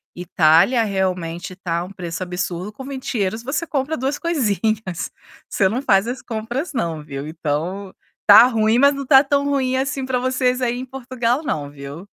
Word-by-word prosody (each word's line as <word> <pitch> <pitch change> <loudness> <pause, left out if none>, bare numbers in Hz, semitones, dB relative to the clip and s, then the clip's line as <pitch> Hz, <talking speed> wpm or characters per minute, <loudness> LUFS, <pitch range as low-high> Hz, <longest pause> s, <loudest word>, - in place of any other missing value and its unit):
Itália 175 +6 +3
realmente 185 -3 -2
está 170 -2 -3
um 180 - -9
preço 180 -2 -5
absurdo, 180 +2 -4
com 265 - -10
€20 230 -6 -3
você 280 +7 -2
compra 290 +2 -1
2 270 +3 -1
coisinhas. 220 - -1 0.4
Você 195 - +2
não 230 +7 -1
faz 200 -5 +3
as 245 0 -4
compras 240 +8 -4
não, 165 - -2
viu, 140 0 -6
então, 170 +5 -3 0.3
está 210 +3 +9
ruim, 225 -2 +2
mas 280 +1 +5
não 275 0 -4
está 270 0 +6
tão 280 0 +1
ruim 265 -2 0
assim 270 0 -2
para 260 -1 0
vocês 255 0 0
aí 245 -1 0
em 255 - -5
Portugal 255 0 -2
não, 145 - -3
viu? 140 +3 -9
220 Hz, 175 wpm, -21 LUFS, 180-260 Hz, 0.4 s, está